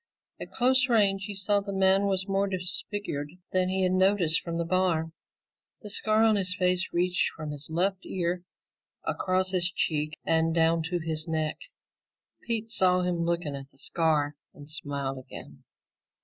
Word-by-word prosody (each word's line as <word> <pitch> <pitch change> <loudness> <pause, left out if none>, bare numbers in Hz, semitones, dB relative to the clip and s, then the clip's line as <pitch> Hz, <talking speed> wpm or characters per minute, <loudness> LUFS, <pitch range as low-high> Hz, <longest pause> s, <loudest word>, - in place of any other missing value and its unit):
At - - -6
close 260 +1 +3
range, 200 -4 +3
he 205 -1 -5
saw 200 +1 +2
the 200 0 -6
man 195 +1 +3
was 190 0 +2
more 195 0 +1
disfigured 180 -4 -3 0.2
than 185 0 +2
he 190 0 +1
had 185 - +2
noticed 185 -3 +3
from 170 -1 -4
the 170 - -1
bar. 170 -2 +1 0.7
The 210 - -4
scar 215 +1 +2
on 220 -2 +4
his 185 -2 0
face 180 -2 +1
reached 180 +1 +1
from 155 -1 -6
his 145 0 -5
left 185 +4 0
ear 175 -1 -2 0.6
across 185 0 0
his 180 -1 +2
cheek 155 -3 -1
and 165 0 +2
down 165 0 +3
to 180 - 0
his 160 -1 -3
neck. 155 -1 -1 0.8
Pete 225 -1 -2
saw 185 -4 +3
him 180 -1 -1
looking 170 -3 -1
at 135 0 -8
the - - -26
scar 150 -1 0 0.2
and 145 0 -12
smiled 140 -3 -4
again. 130 - -11
180 Hz, 165 wpm, -28 LUFS, 160-195 Hz, 0.8 s, on